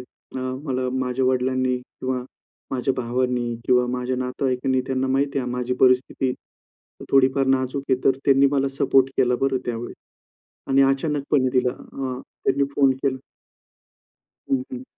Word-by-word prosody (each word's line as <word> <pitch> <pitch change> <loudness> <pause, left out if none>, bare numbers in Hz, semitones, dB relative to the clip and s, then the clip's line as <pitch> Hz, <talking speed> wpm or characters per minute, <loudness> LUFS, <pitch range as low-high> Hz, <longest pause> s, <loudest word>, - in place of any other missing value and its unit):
अ, - - -12 0.3
मला 130 -2 -1
माझ्या 130 0 -1
वडिलांनी 130 0 +1
किंवा 125 0 -5 0.5
माझ्या 130 +1 0
भावांनी 125 -1 -1
किंवा 125 -1 +4
माझ्या 125 +1 -2
नातेवाईकांनी 130 0 0
त्यांना 130 0 -1
माहिती 140 +1 0
आहे 125 -2 -2
माझी 125 0 -2
परिस्थिती 130 0 +3 0.8
थोडीफार 135 0 +4
नाजूक 135 +1 0
आहे, 130 - +3
तर 135 - +4
त्यांनी 140 0 +5
मला 140 -1 +2
सपोर्ट 135 0 +3
केला 125 -1 +3
बरं 135 -1 +1
त्यावेळेस. 120 0 -4 0.7
आणि 135 0 +5
अचानकपणे 135 0 +1
तिला 125 -1 +3
अ, 130 0 -6 0.2
त्यांनी 140 +1 +2
फोन 135 -2 +4
केला 135 -2 +1 1.3
हं, 270 -1 +2
हं. 260 0 -6
130 Hz, 135 wpm, -23 LUFS, 125-135 Hz, 1.3 s, त्यांनी